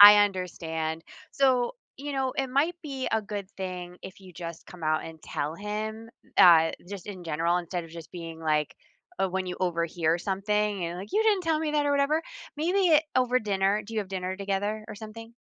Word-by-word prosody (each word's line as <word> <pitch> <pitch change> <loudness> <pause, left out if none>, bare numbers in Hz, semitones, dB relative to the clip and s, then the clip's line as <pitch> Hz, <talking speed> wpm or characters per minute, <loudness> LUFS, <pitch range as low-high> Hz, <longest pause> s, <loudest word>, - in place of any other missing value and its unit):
I 205 0 +13
understand. 165 -4 -3 0.3
So, 260 -3 +3 0.2
you 285 +2 -5
know, 265 -1 0
it 270 -1 0
might 295 +7 +2
be 270 -4 -3
a 220 -1 +2
good 205 -2 -5
thing 180 -2 -5
if 190 +1 -9
you 185 -1 -13
just 170 -1 -7
come 180 -2 -12
out 155 0 +1
and 160 -1 -9
tell 150 +2 -3
him, 215 +3 -4 0.3
uh, 165 -2 +8 0.2
just 200 -2 -7
in 185 -4 -7
general 165 +2 +1
instead 175 0 -3
of 165 - -12
just 165 -1 -9
being 165 -2 -7
like 150 -1 +1 0.4
uh, 190 - +2
when 185 0 -2
you 180 - -4
overhear 170 -2 +1
something 200 0 0
and 170 +1 -4
like, 200 +3 -7
"You 435 - +4
didn't 420 -4 +3
tell 320 -2 +2
me 310 -1 -1
that 295 -1 +2
or - - +2
whatever." 285 +3 +3 0.4
Maybe 355 +6 +2
it 310 -1 +6
over 255 0 +4
dinner. 200 -2 +1
Do 225 +2 -9
you 220 - +1
have 195 - -6
dinner 185 0 -3
together 205 +2 -1
or 215 - -6
something? 225 +2 -9
195 Hz, 205 wpm, -28 LUFS, 175-240 Hz, 0.4 s, I